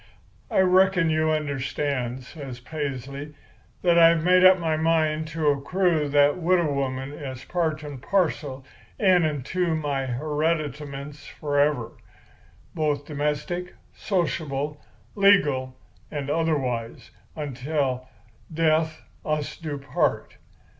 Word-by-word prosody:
"'I - - +3
reckon 185 -2 +4
you 155 0 +2
understand,' 140 -4 -2
says 135 -3 -9
Paisley, 140 +1 -5 0.5
'that 170 -1 +5
I've 165 -1 +6
made 180 +1 +5
up 185 0 +8
my 165 -3 0
mind 155 -1 +1
to 155 -1 0
accrue 155 +2 +1
that 145 +2 +4
widow 175 -3 +2
woman 135 0 -2
as 130 -4 -7
part 160 -3 -1
and 145 -4 -8
parcel 145 -7 -1 0.3
in 185 -4 +4
and 150 -5 -1
to 180 -1 0
my 140 -4 -2
hereditaments 150 0 -3
forever, 145 -4 0 0.8
both 150 -3 -1
domestic, 150 +5 -3 0.2
sociable, 150 -6 -2 0.3
legal, 145 -11 +3 0.3
and 145 -1 -4
otherwise, 135 -8 -1 0.2
until 135 -2 -2 0.4
death 160 0 +1 0.2
us 150 -1 -2
do 155 -4 -5
part. 140 0 -1
150 Hz, 110 wpm, -25 LUFS, 140-165 Hz, 0.8 s, up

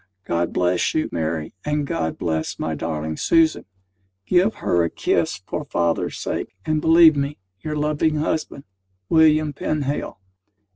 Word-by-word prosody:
God 85 0 -1
bless 90 0 +1
you, 155 - 0
Mary, 80 -1 -3
and 150 -1 -1
God 80 -11 -2
bless 80 -1 -2
my 80 - -2
darling 80 0 -3
Susan! 165 -1 +2 0.6
Give 185 +4 +3
her 85 -1 +1
a 85 - 0
kiss - - -1
for - - -4
father's 85 -1 -1
sake, - - -4
and 155 -1 0
believe 160 -1 +7
me, 140 +1 -2 0.2
Your 150 +10 -4
loving 150 +1 +1
husband, 150 -2 -2 0.5
WILLIAM 155 -2 +4
PENHALE. 145 -6 -3
145 Hz, 140 wpm, -22 LUFS, -, 0.6 s, believe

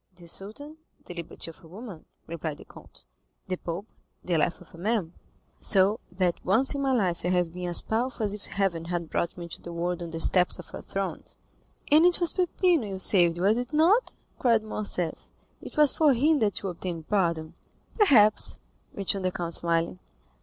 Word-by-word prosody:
"The 175 -1 -14
Sultan, 220 - -6 0.3
the - - -8
liberty 170 -1 -6
of 165 - -21
a - - -14
woman," 195 -1 -10 0.2
replied 160 -2 -5
the - - -13
Count; - - -13 0.4
"the 185 - -1
Pope, 175 +2 -6 0.4
the 180 - -1
life 165 +2 0
of 180 - -18
a - - -12
man; 195 -4 -1 0.5
so 200 +3 +3
that 180 -1 -1
once 225 +10 +3
in 280 - -3
my 270 -1 +1
life 185 -9 0
I - - -1
have 180 -2 +1
been 180 0 -5
as 175 - +3
powerful 230 0 -2
as 205 - -2
if 205 -1 -8
heaven 180 -5 -1
had 170 -1 -4
brought 170 - -2
me 175 - -7
into 170 - -6
the 170 - -8
world 175 +1 -3
on 170 - -5
the 165 0 -5
steps 180 +2 +4
of 180 - -12
a - - -7
throne." 195 -1 -4 0.7
"And 305 +2 +7
it 355 0 +4
was 345 -2 +4
Peppino 355 - +1
you 195 -1 -5
saved, 175 -3 +4
was 200 +6 +2
it 245 +2 -6
not?" 355 +11 +3 0.3
cried 230 -3 +3
Morcerf; 205 -5 -3 0.3
"it - - -11
was 300 -2 +7
for 305 -3 +4
him 295 +5 +3
that 205 -3 0
you 195 - -2
obtained 170 -2 -6
pardon?" 170 -6 0 0.5
"Perhaps," 220 - +5 0.4
returned 195 -1 -1
the 185 - +1
count, 170 -2 -4
smiling. 170 +1 +1
190 Hz, 195 wpm, -27 LUFS, 170-230 Hz, 0.7 s, And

